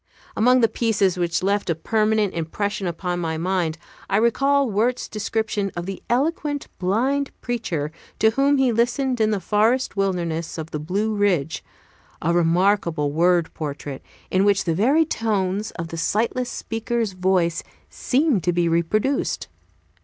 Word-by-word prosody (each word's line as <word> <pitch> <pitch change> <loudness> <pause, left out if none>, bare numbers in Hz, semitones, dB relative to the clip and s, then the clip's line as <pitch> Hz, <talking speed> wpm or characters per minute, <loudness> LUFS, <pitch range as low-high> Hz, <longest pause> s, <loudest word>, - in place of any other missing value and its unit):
Among 250 +3 +4
the 230 - +5
pieces 215 -5 +1
which 175 0 0
left 200 0 0
a 165 - +2
permanent 215 +3 +1
impression 190 +4 -2
upon 175 +1 -3
my 160 -2 -2
mind 170 -2 -1 0.3
I 195 - +2
recall 275 +5 +3
Wirt's 230 +4 0
description 215 -1 -2
of 175 0 -4
the 195 0 -6
eloquent 290 +2 0
blind 260 +10 +1
preacher 175 - -3 0.3
to 220 - +4
whom 275 +4 +3
he 265 -2 +3
listened 245 +2 0
in 215 - +3
the 210 -2 0
forest 220 +8 +1
wilderness 170 -5 -1
of 160 0 -6
the 150 - -3
Blue 200 +8 -1
Ridge, 185 -7 0 0.6
a 170 - 0
remarkable 170 -3 +2
word 170 +1 +2
portrait, 145 -2 -5 0.3
in 185 +1 +3
which 200 -1 +3
the 165 - 0
very 270 - +3
tones 210 - -1
of 165 0 -4
the 165 - -6
sightless 230 +8 0
speaker's 225 -1 -2
voice 180 -2 +1 0.3
seemed 265 - +1
to 175 - +3
be 175 0 +1
reproduced. 170 +11 0
200 Hz, 150 wpm, -23 LUFS, 170-230 Hz, 0.6 s, the